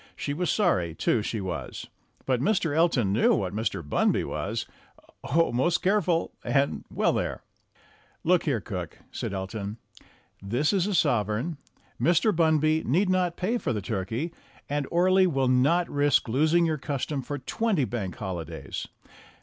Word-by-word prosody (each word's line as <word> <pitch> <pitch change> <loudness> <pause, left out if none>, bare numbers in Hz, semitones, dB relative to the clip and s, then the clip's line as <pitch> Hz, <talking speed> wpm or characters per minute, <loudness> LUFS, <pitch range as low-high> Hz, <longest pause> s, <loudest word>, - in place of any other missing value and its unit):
She 145 - -3
was 180 +4 -1
sorry, 90 - +1
too, 115 - +1
she 110 +1 -3
was. 95 -2 -5 0.4
But 130 -2 +1
Mr. 165 -3 +1
Elton 140 - +3
knew 110 - +4
what 95 -1 -2
Mr. 105 -7 -2
Bunby - - +2
was - - -3 0.6
oh; 165 +4 +2
most 150 +9 +1
careful! 185 -4 +2
and 140 0 +1
well, - - +1
there! - - -2 0.8
"Look 180 +1 +3
here, 135 -7 +1
cook," 90 -5 -6
said - - -4
Elton, 100 +2 -4 0.6
"this 120 - 0
is 190 -1 +2
a 205 - 0
sovereign. 120 - +1 0.4
Mr. 175 +5 +3
Bunby 160 -1 +3
need 185 - +2
not 180 -2 +1
pay 225 +7 0
for 120 - -1
the 105 - -1
turkey, 110 - -3 0.3
and 145 -1 -2
Orley 185 +2 +4
will 135 -6 +1
not 140 +8 +3
risk 145 -2 +2
losing 155 +8 +3
your 155 -2 0
custom 140 0 -2
for 145 +3 -5
twenty 190 - 0
Bank 105 -7 -4
Holidays. 80 -6 -5
145 Hz, 150 wpm, -27 LUFS, 110-170 Hz, 0.8 s, knew